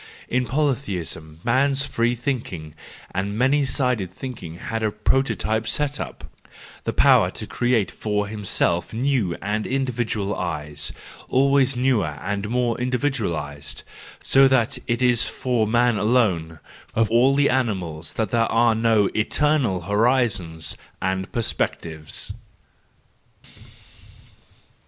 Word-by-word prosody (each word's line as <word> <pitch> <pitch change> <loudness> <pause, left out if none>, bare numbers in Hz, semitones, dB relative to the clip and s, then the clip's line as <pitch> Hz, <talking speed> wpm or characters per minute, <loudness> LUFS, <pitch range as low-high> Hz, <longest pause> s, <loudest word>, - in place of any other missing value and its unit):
In 125 0 0
polytheism 95 - -2
man's 135 +3 +2
free 120 -3 0
thinking 115 - -4 0.4
and 100 +3 -2
many 135 +4 +3
sided 125 -8 0
thinking 95 -7 -7
had 115 +5 -4
a 110 - +1
prototype 110 0 0
set 145 +3 -1
up: - - -6 0.6
the - - 0
power - - +5
to - - -5
create 120 -6 0
for 105 -1 -1
himself 100 -4 -1
new 120 -8 +1
and 105 +2 -1
individual 120 -6 -1
eyes, 75 0 -3 0.4
always 135 0 +3
newer 120 - +1
and 100 +4 -3
more 120 0 0
individualised: 110 - -2 0.4
so 135 0 +6
that 130 -4 +2
it 120 +1 0
is 120 -2 +4
for 120 -4 0
man 120 0 +3
alone, 100 -9 +1 0.4
of 115 0 +3
all 125 +4 +4
the 145 0 +3
animals, 95 -11 -2
that 110 -4 -2
there 115 -1 +2
are 115 0 +4
no 110 -2 +3
eternal 125 - +1
horizons 105 -6 +1 0.2
and 95 +1 -2
perspectives. 85 -5 -3
115 Hz, 115 wpm, -23 LUFS, 95-125 Hz, 0.6 s, so